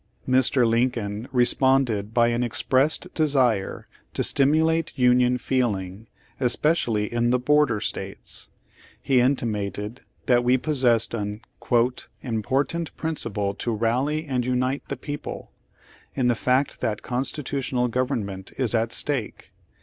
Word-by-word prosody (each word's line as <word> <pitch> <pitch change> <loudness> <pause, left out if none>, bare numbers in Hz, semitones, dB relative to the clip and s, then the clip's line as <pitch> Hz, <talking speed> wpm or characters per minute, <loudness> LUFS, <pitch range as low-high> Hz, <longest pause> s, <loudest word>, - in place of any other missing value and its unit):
Mr. 130 -1 +3
Lincoln 115 -2 -1
responded 125 -4 +2
by 120 0 +3
an 120 +1 0
expressed 135 +8 +1
de 155 -1 +2
sire 125 -9 0 0.3
to - - +1
stimulate 160 +4 +2
Union 125 0 +4
feeling 110 -5 -2 0.3
especially 120 -4 +1
in 120 0 +1
the 125 - +3
border 135 -3 +2
States. 100 -2 -5 0.5
He 130 -2 +2
intimated 110 -3 -1 0.2
that 120 -1 +4
V\^e 125 +1 +3
possessed 125 -6 +1
an 105 -1 -4 0.8
"important 135 +8 -2
principle 105 -11 -2
to 115 +2 -3
rally 130 +8 0
and 130 -4 -1
unite 125 +2 0
the - - -4
people, 145 0 -7 0.6
in 125 -3 +1
the - - +4
fact 130 +4 0
that 105 -2 -2
constitutional 130 -1 -1
government 115 -6 -3
is 125 -4 0
at 115 0 +1
stake. 135 -6 -2
125 Hz, 120 wpm, -24 LUFS, 115-135 Hz, 0.8 s, Union